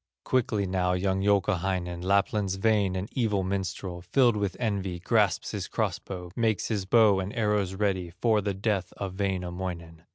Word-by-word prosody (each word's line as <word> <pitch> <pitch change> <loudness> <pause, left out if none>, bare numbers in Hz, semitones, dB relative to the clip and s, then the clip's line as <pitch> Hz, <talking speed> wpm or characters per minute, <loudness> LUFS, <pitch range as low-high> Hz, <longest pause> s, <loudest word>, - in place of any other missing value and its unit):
Quickly 120 -6 +1
now 90 -1 0
young 95 +1 0
Youkahainen, 95 -3 0
Lapland's 100 0 +1
vain 100 -2 +2
and 95 +2 -3
evil 105 -6 0
minstrel, 95 -1 -3
Filled 120 +5 +3
with 100 -3 -2
envy, 100 -6 -1
grasps 105 0 +1
his - - -4
cross - - -1
bow, 90 -2 -8
Makes 110 -4 0
his 105 -4 -1
bow 105 -1 +5
and 95 +1 -3
arrows 105 -4 0
ready 95 -3 0
For 110 +4 +1
the 100 -1 -2
death 100 -2 -1
of 95 0 -5
Wainamoinen. 90 -3 -3
95 Hz, 160 wpm, -27 LUFS, 90-105 Hz, -, bow